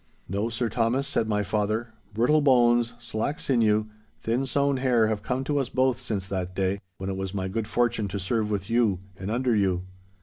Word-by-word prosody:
'No, 100 +5 -1
Sir 115 +1 -1
Thomas,' 120 +4 0
said 115 -5 0
my 105 -1 +1
father, 110 +3 -1 0.2
'brittle 125 +9 +3
bones, 120 -3 +4
slack 120 +5 -3
sinew, 110 -5 +2 0.4
thin 125 +4 0
sown 140 0 +2
hair 125 -4 +3
have 110 -1 -1
come 130 +4 -2
to 145 +1 0
us 135 - -1
both 130 -1 +1
since 105 -7 -3
that 95 -2 -3
day, 95 +1 0 0.2
when 95 - -5
it 95 - -4
was 95 0 -4
my 95 -1 -1
good 105 +3 -3
fortune 115 -3 +1
to 100 - -4
serve 105 +3 0
with 100 -2 -2
you 115 -4 +2 0.2
and 95 +1 -6
under 120 +1 +1
you. 95 -3 +1
115 Hz, 200 wpm, -26 LUFS, 100-125 Hz, 0.4 s, bones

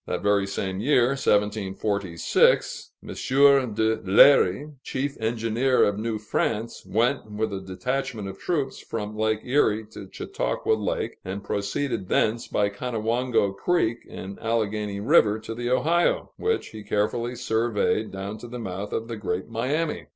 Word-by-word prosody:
That - - -3
very 100 -1 +2
same 95 -1 -3
year 125 +1 +3
(1746), 105 -7 +1
M. - - -11 0.7
de 110 +1 +2
Léry, 140 +6 +5
chief 140 +2 -3
engineer 115 +3 +1
of 105 0 +1
New 110 0 -2
France, 110 +1 -2
went 115 +4 0
with 105 0 -2
a 95 - -4
detachment 110 +3 -3
of 95 0 -8
troops 145 -7 -2
from 105 -1 -5
Lake 110 0 0
Erie 110 -5 +2
to 100 -3 -10
Chautauqua - - -1
Lake, 105 -2 -2
and 95 +2 -5
proceeded 100 +2 -2
thence 115 +2 +1
by 105 - +1
Conewango 115 0 0
Creek 120 - +1
and 95 +1 -8
Alleghany 105 -3 -1
River 105 0 +4
to 110 +1 -7
the 120 +1 -3
Ohio, 165 +7 +2
which 450 0 -1
he 110 - -9
carefully 115 +4 -1
surveyed 110 -1 0
down 100 +2 -6
to 120 - -9
the 125 +1 -7
mouth 100 -2 -5
of 115 - -2
the 115 -1 -5
Great 95 -3 -3
Miami. 150 +7 -2
110 Hz, 145 wpm, -25 LUFS, 100-120 Hz, 0.7 s, Léry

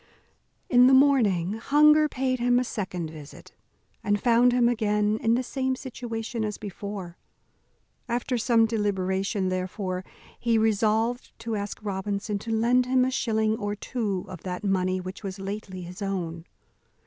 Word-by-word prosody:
In 250 0 +6
the 265 - +6
morning 220 -10 +3
hunger 300 +6 +4
paid 255 -1 -1
him 245 0 +3
a 250 - +2
second 180 -8 -4
visit, 150 -2 -12 0.5
and 205 0 +1
found 240 +2 +4
him 245 -1 +3
again 210 -2 +1
in 225 +1 +2
the 255 - 0
same 260 0 -1
situation 230 -3 -5
as 210 -1 -3
before. 200 -3 -7 0.9
After 245 +2 -1
some 230 -1 +3
deliberation, 195 -2 -1
therefore, 185 0 -3 0.4
he 230 -2 +2
resolved 220 +2 +1
to 230 -1 -3
ask 205 -1 -4
Robinson 200 +1 -3
to 225 +2 -6
lend 240 +3 +3
him 255 0 +3
a 260 - -1
shilling 220 -3 +1
or 205 -1 -2
two 205 -4 -3
of 185 -3 -9
that 180 0 -5
money 185 -2 +1
which 185 +1 -7
was 195 -1 -5
lately 195 -1 -6
his 180 +3 -9
own. 175 -4 -3
215 Hz, 150 wpm, -26 LUFS, 190-240 Hz, 0.9 s, In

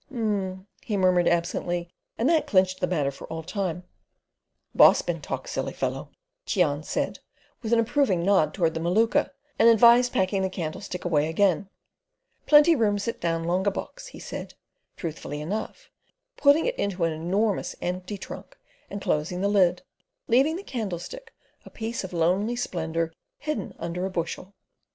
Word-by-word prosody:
"Um," 200 -7 -2 0.2
he 210 - -2
murmured 180 -2 +3
absently, 170 0 0 0.3
and 235 - +1
that 320 -1 +3
clinched 185 -2 +2
the 180 - 0
matter 150 -6 0
for 140 - -11
all 160 0 -6
time. 180 0 -3 0.9
"Boss - - +6
bin - - -3
talk - - -5
silly - - -3
fellow" - - -3 0.4
Cheon 155 -7 +1
said, - - -2 0.4
with 220 - -4
an 235 - +5
approving 230 - +2
nod 185 -6 +3
toward 165 -2 0
the 160 - -3
Maluka, 195 +8 +2 0.3
and 230 - +7
advised 235 +2 +6
packing 190 +1 +1
the 190 - 0
candlestick 180 +1 -5
away 155 -3 +2
again. 195 +2 +1 0.8
"Plenty 300 +2 +7
room 210 -5 +2
sit 215 +3 -4
down 165 -1 0
longa 180 +4 +1
box," - - -7
he - - -11
said, - - -7 0.4
truthfully 150 -3 -5
enough, 215 - -5 0.4
putting 290 +2 +4
it - - -2
into 195 -3 -1
an 165 -1 +1
enormous 190 +6 -1
empty 180 +3 -4
trunk - - -10 0.3
and 200 0 -6
closing 155 +4 -1
the 200 - +2
lid, 185 -3 +3 0.4
leaving 270 +7 +3
the 380 - -6
candlestick 250 - -5 0.3
a - - -12
piece 225 0 -4
of 190 - -6
lonely 185 +7 +1
splendour 165 -7 -2 0.2
hidden 295 -10 -4
under 170 +2 -4
a - - -5
bushel. 180 +2 -4
190 Hz, 160 wpm, -26 LUFS, 170-225 Hz, 0.9 s, and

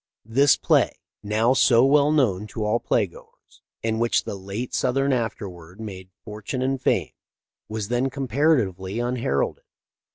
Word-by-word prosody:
This 130 +5 +4
play, - - +2 0.3
now 110 +4 +2
so 130 -2 +5
well 145 +1 +4
known 105 -10 +1
to 105 +1 -4
all 110 +3 +1
play 110 -2 +1
goers, 85 - -18 0.2
in 110 0 -1
which 115 0 +2
the - - -5
late 100 +5 -6
Sothern 135 +2 +1
afterward 95 -7 -5
made 95 -4 -8 0.2
fortune 110 +4 -4
and 135 0 -1
fame, - - 0 0.6
was 110 -1 -4
then 125 +2 +1
comparatively 125 - 0
unheralded. 120 - -1
115 Hz, 140 wpm, -24 LUFS, 100-130 Hz, 0.6 s, so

